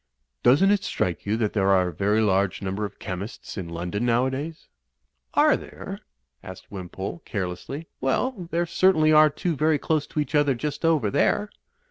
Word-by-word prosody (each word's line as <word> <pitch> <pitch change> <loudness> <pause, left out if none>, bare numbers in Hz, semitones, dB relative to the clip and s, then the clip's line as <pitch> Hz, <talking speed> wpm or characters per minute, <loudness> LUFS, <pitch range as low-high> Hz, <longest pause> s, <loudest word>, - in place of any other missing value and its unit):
"Doesn't 145 +11 +5
it 205 -1 +2
strike 90 - -2
you 105 +2 +1
that 110 -3 -1
there 100 -2 +2
are 95 -2 +4
a - - -8
very 105 +6 +1
large 100 -2 +1
number 100 +2 -2
of 100 - -8
chemists 95 +3 -6
in 90 -4 -5
London 90 +6 -3
nowadays?*' 130 +7 -1 0.7
'^Are - - +5
there?" - - -8 0.4
asked 95 -1 -11
Wimpole, 95 - -6
carelessly. 100 - -5
"Well, 180 - -1
there 170 +1 0
certainly 170 -2 +3
are 155 0 +7
two 160 +3 -2
very 155 +1 +2
close 150 0 -1
to - - -4
each 145 -1 -2
other 145 -3 +3
just 145 +6 -4
over 155 -11 +2
there." 210 - +1
125 Hz, 170 wpm, -25 LUFS, 100-155 Hz, 0.7 s, are